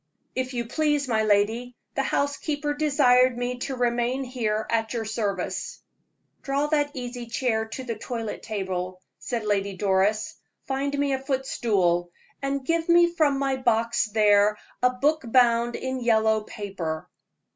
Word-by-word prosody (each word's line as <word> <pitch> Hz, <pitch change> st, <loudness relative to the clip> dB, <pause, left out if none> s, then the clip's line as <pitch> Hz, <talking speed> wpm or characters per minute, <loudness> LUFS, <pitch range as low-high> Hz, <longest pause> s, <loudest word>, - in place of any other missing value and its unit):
"If 255 Hz, 0 st, -3 dB
you 235 Hz, -1 st, -1 dB
please, 295 Hz, +2 st, 0 dB
my 220 Hz, -3 st, +2 dB
lady, 220 Hz, +4 st, +1 dB, 0.2 s
the -, -, 0 dB
housekeeper 290 Hz, +2 st, -1 dB
desired 260 Hz, -4 st, +4 dB
me 245 Hz, 0 st, -2 dB
to 265 Hz, +1 st, -3 dB
remain 245 Hz, +2 st, 0 dB
here 220 Hz, -4 st, -2 dB
at 225 Hz, 0 st, 0 dB
your 230 Hz, -2 st, -2 dB
service." 205 Hz, -4 st, -3 dB, 0.6 s
"Draw 280 Hz, +1 st, 0 dB
that 295 Hz, -2 st, +2 dB
easy 245 Hz, -1 st, -5 dB
chair 230 Hz, -2 st, 0 dB
to 240 Hz, +4 st, -6 dB
the 235 Hz, -2 st, -3 dB
toilet 230 Hz, -3 st, -4 dB
table," 185 Hz, -3 st, -4 dB, 0.2 s
said 235 Hz, -3 st, -3 dB
Lady 200 Hz, -1 st, 0 dB
Doris; 200 Hz, +2 st, +1 dB, 0.3 s
"find 275 Hz, +1 st, -1 dB
me 280 Hz, -1 st, +1 dB
a 265 Hz, -, 0 dB
footstool, 210 Hz, -10 st, 0 dB, 0.3 s
and 275 Hz, -1 st, -2 dB
give 330 Hz, +2 st, 0 dB
me 345 Hz, 0 st, +5 dB
from 300 Hz, -5 st, +2 dB
my 270 Hz, -1 st, 0 dB
box 230 Hz, -2 st, +1 dB
there 210 Hz, -1 st, +4 dB, 0.2 s
a 250 Hz, -, +5 dB
book 290 Hz, +5 st, +1 dB
bound 235 Hz, 0 st, +3 dB
in 260 Hz, 0 st, -3 dB
yellow 220 Hz, -2 st, +3 dB
paper." 190 Hz, -8 st, -5 dB
245 Hz, 145 wpm, -25 LUFS, 215-270 Hz, 0.6 s, me